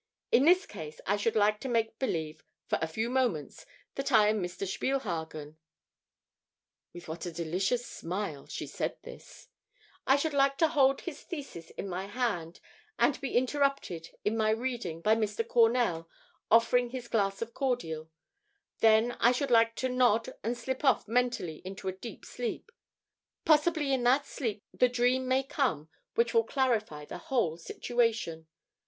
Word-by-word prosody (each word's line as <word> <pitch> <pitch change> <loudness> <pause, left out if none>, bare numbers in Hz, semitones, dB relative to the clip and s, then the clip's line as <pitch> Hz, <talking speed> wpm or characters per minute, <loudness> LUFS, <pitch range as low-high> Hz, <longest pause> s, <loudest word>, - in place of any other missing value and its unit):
In 260 - +5
this 365 +4 +5
case 155 -1 -9
I 200 - +2
should 205 +2 0
like 210 0 +3
to 265 - -5
make 225 -2 0
believe 160 -10 -2 0.2
for - - 0
a 160 - 0
few 220 +8 -2
moments 215 - -1 0.3
that 275 +1 -3
I 215 -3 +6
am 215 -1 +1
Mr. 180 +2 -4
Spielhagen" 165 - -3 1.3
(with 175 0 -11
what 165 +3 -5
a - - -4
delicious 180 +9 -1
smile 170 -4 -5
she - - -5
said - - -3
this) - - -12 0.6
"I 270 - +6
should 295 +2 0
like 275 0 +3
to 325 0 +4
hold 270 -2 +3
his 315 -5 -7
thesis 275 - -8
in - - -6
my 190 +1 -4
hand 205 -7 -2 0.4
and - - +2
be 270 -3 0
interrupted 260 - 0 0.2
in 210 +2 +1
my 220 -1 +2
reading 225 -7 -2
by 215 +5 +4
Mr. 220 0 -1
Cornell 225 -9 +2 0.4
offering 235 +2 +4
his 250 -1 -6
glass 200 -2 0
of 230 0 -11
cordial; 165 - -2 0.7
then 225 +2 +5
I 240 - +5
should 255 +1 -1
like 230 0 +5
to 260 - -1
nod 245 -3 +2
and 235 +3 -1
slip 260 +3 -4
off 265 -7 +3
mentally 235 -9 0
into 195 +1 -7
a - - +1
deep 220 +3 -9
sleep. 245 - -5 0.7
Possibly 305 -2 +3
in 260 - +1
that 265 +4 +4
sleep 220 -6 -4
the 250 - +3
dream 250 +1 +1
may 260 +1 +2
come 240 - -1 0.3
which 235 0 +2
will 230 -1 +5
clarify 225 - 0
the - - -7
whole 235 - 0
situation. 220 -4 -1
230 Hz, 160 wpm, -30 LUFS, 180-255 Hz, 1.3 s, I